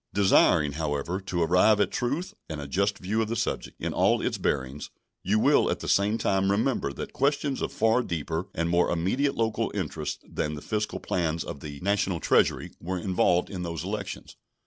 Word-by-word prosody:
Desiring, 95 -6 +4
however, 75 +4 -2
to 90 -3 -1
arrive 90 +6 +4
at 105 - +2
truth 140 +9 -2 0.2
and 80 -2 -4
a 70 - -6
just 100 +6 0
view 105 +5 -1
of 110 - 0
the 115 - -2
subject - - -3
in - - -3
all - - +3
its - - -2
bearings, 70 +1 -2 0.3
you 100 +4 +1
will - - +4
at - - -1
the - - -6
same 105 +3 +2
time 95 -3 +1
remember 105 - +1
that - - -7
questions 140 0 0
of - - -2
far 115 +2 +2
deeper 80 -4 -3
and 85 0 0
more 85 +1 +2
immediate 100 +12 0
local 110 -2 0
interest - - -4
than 75 0 -3
the 75 - -8
fiscal 105 0 -2
plans 85 -2 -1
of 70 - -7
the 70 -1 -8
National 100 -2 0
Treasury - - +2
were 95 +2 -3
involved 90 0 +1
in 95 -3 -4
those 85 -1 -4
elections. 100 +1 -5
95 Hz, 190 wpm, -27 LUFS, 80-105 Hz, 0.3 s, Desiring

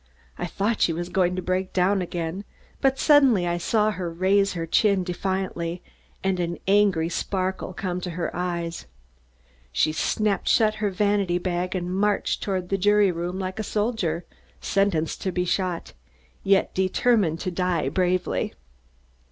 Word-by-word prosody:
I 175 - -4
thought 210 +5 -1
she 165 - +3
was 175 +2 -4
going 180 -1 +1
to 185 - -3
break 185 +1 -1
down 190 +2 +2
again, 175 +1 -4 0.4
but 270 -1 +3
suddenly 270 - +5
I 175 0 -1
saw 215 +4 +2
her 180 -4 -4
raise 195 +3 +2
her 165 -2 -3
chin 195 +2 +3
defiantly 180 -1 -3 0.4
and 190 -1 0
an 170 0 -2
angry 195 -5 +3
sparkle 185 +2 -2
come 180 -1 -3
to 180 - -4
her 175 - -3
eyes. 170 - -3 0.8
She 70 - +2
snapped 205 +6 0
shut 215 -1 +4
her 210 - +2
vanity 200 -2 +1
bag 180 +1 -2
and 180 0 -2
marched 205 +2 0
toward 185 -3 -2
the 195 - 0
jury 205 0 +4
room 175 +2 -4
like 190 +2 -4
a - - -1
soldier, 205 -7 -1 0.3
sentenced 195 -5 0
to 190 - -1
be 180 0 -1
shot, 180 - -2 0.5
yet 195 0 +3
determined 190 -2 +2
to 185 - -2
die 180 -1 0
bravely. 185 -1 0
185 Hz, 155 wpm, -25 LUFS, 175-200 Hz, 0.8 s, suddenly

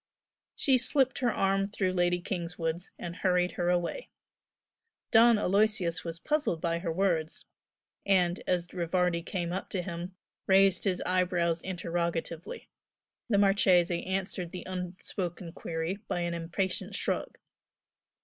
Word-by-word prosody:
She 265 -2 +3
slipped 260 +1 +2
her 245 -3 +2
arm 195 0 +1
through 190 -2 -1
Lady 175 -1 +2
Kingswood's 170 -1 -3
and 175 +1 -6
hurried 180 -1 +2
her 175 0 -1
away. 180 - -1 1.0
Don 230 0 +7
Aloysius 200 -3 +1
was 165 -1 -5
puzzled 290 - 0
by 170 0 0
her 170 -1 -2
words, 165 -3 0 0.6
and, 180 -2 +2
as 175 -1 0
Rivardi 175 0 +1
came 175 0 -3
up 190 - -4
to 185 -3 -2
him 175 +1 -6 0.3
raised 195 -1 +4
his 185 -3 +1
eyebrows 180 -2 +1
interrogatively. 170 -2 -3 0.6
The 205 - +3
Marchese 185 -4 +4
answered 190 -2 -2
the 180 - -6
unspoken 180 -1 -5
query 165 +3 -3
by 175 - -1
an 175 0 -1
impatient 170 +3 -2
shrug. - - -2
180 Hz, 130 wpm, -30 LUFS, 170-195 Hz, 1.0 s, Don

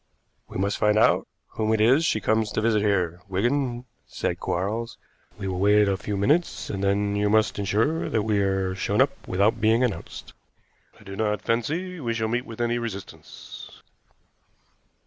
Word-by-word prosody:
"We - - -6
must 100 +2 -1
find 105 0 +3
out 110 - +3 0.2
whom 110 0 -1
it - - -2
is 130 +9 +4
she 110 - +1
comes 110 0 +1
to - - 0
visit 110 -1 +2
here, 90 -4 0
Wigan," 120 +5 -1 0.2
said - - -3
Quarles. 110 +6 -2 0.4
"We 100 -2 -5
will 90 -1 -3
wait 105 +1 +4
a 100 - +1
few 100 +2 -4
minutes, 150 - +1
and 95 -1 -4
then 100 +1 +1
you 105 0 +1
must 110 -1 +2
insure 110 - 0
that 110 - 0
we 105 -1 +1
are 95 -1 0
shown 95 - -1
up - - +5 0.2
without 100 +5 +1
being 110 +3 +3
announced. 120 -5 -4 0.7
I - - -16
do 95 -1 -8
not 105 -1 -1
fancy 165 +11 -2
we 115 -5 -2
shall 110 -1 -1
meet 120 +2 -2
with 115 0 -9
any 120 0 0
resistance." 105 -5 -9
110 Hz, 175 wpm, -25 LUFS, 100-115 Hz, 0.7 s, up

